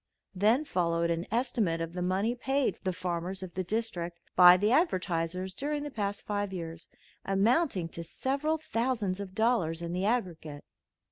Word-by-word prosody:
Then 220 +10 +3
followed 170 - 0
an 170 +1 -2
estimate 230 -7 0
of 165 0 -4
the 180 - -4
money 190 +6 +1
paid 270 +2 0
the 190 - 0
farmers 180 +1 -3
of 180 -2 -8
the 185 - -2
district 180 -4 -3 0.2
by 180 0 +9
the 205 +4 +2
advertisers 185 - 0
during 290 +4 -2
the 295 - -5
past 205 -4 -3
five 205 -1 -2
years, 165 -2 -6 0.4
amounting 200 - +2
to 170 - -6
several 280 - -1
thousands 230 -9 -1
of 190 -2 -7
dollars 215 -8 +1
in 170 0 -4
the 185 +2 -1
aggregate. 170 -10 -2
190 Hz, 160 wpm, -30 LUFS, 175-235 Hz, 0.4 s, by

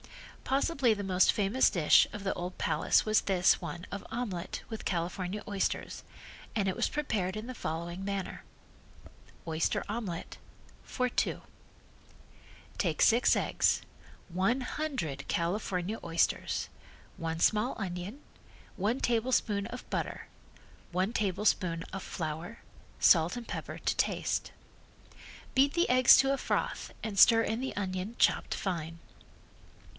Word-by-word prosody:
Possibly 270 -3 +2
the 205 -1 -4
most 185 -1 +4
famous 210 +5 +3
dish 165 -5 +5
of 210 -1 -7
the 190 - +1
old 180 +1 -6
Palace - - +2
was 215 0 +3
this 185 -2 +3
one 175 0 -6
of 200 - -6
omelet 210 -7 -4
with 220 -1 -6
California 180 +3 -2
oysters, 200 -2 -2 0.5
and 200 -3 +1
it 190 - 0
was - - 0
prepared 215 -10 -2
in 215 - -5
the 255 - -5
following 170 -2 -4
manner: 195 -1 -4 1.0
Oyster 160 0 0
Omelet 205 -6 -5 0.4
(For 250 -1 -1
two): 245 - -1 1.4
Take - - 0
six 235 +2 +5
eggs, - - +2 0.5
one 190 +9 +1
hundred 250 - -3
California 180 +3 -1
oysters, 165 -1 0 0.5
one 165 0 -4
small 215 +7 +2
onion, 190 +7 -5 0.5
one 215 +7 0
tablespoonful 225 -4 +1
of 250 - -9
butter, - - -3 0.6
one 185 +5 0
tablespoonful 185 -4 0
of 195 - -4
flour, 165 +6 -5 0.4
salt 170 +4 +5
and 240 - -7
pepper - - -5
to - - -1
taste. - - -1 1.0
Beat 275 +3 +4
the 345 - +3
eggs 255 0 +8
to 270 0 +3
a - - 0
froth - - -2
and 215 -3 -4
stir 225 +2 +7
in 225 +2 -2
the 265 - -4
onion 190 +2 -3
chopped - - +2
fine. 165 -3 -4
200 Hz, 130 wpm, -30 LUFS, 180-230 Hz, 1.4 s, eggs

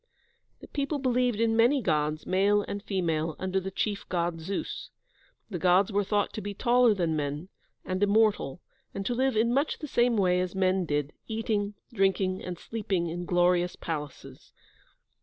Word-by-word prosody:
The - - -11
people 285 +1 -2
believed 250 -4 +1
in 225 -1 +2
many 240 +5 +4
Gods, 155 - 0
male 200 +2 +3
and 200 - -4
female, 165 -6 -1
under 190 0 -1
the 190 0 -5
chief 200 +1 -3
God, 170 -2 -1
Zeus. 200 - -4 0.6
The 180 - -3
Gods 185 +4 +4
were 205 0 +1
thought 205 +1 0
to 215 - -4
be 205 0 -5
taller 240 0 +4
than 170 -4 0
men, 150 +4 -3 0.4
and 185 +1 -2
immortal, 205 -7 +2 0.3
and 195 - -4
to 245 - 0
live 260 -1 +1
in 230 +2 +3
much 280 +4 +1
the 305 - -6
same 240 -3 +2
way 180 -2 +3
as 185 +1 -3
men 185 -1 +2
did, 145 -1 -1
eating, 215 -2 -1 0.2
drinking, 195 -2 +1
and 180 -1 -5
sleeping 195 -5 -2
in 175 +2 -4
glorious 175 0 +2
palaces. 150 -4 -7
195 Hz, 170 wpm, -28 LUFS, 175-225 Hz, 0.6 s, many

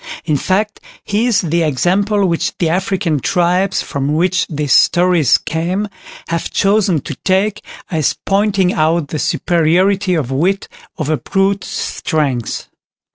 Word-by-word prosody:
In 155 -3 +1
fact, 200 +8 -1 0.2
he 215 +4 0
is 235 - +2
the 170 0 0
example 195 +7 +1
which 170 0 -1
the 170 - +1
African 180 -3 0
tribes 180 +6 +1
from 140 +2 -2
which 180 +3 +1
these 150 -4 -1
stories 175 -6 +4
came, 180 +6 -2 0.4
have 170 0 -2
chosen 195 -5 +2
to 150 - -6
take 195 +2 +1 0.3
as 155 -4 +1
pointing 195 -2 +2
out 155 -1 +1
the 155 - -3
superiority 180 +5 +1
of 140 -6 -2
wit 180 +9 0 0.3
over 155 -2 -1
brute 195 +2 0
strength. 135 -7 -2
175 Hz, 130 wpm, -16 LUFS, 155-195 Hz, 0.4 s, stories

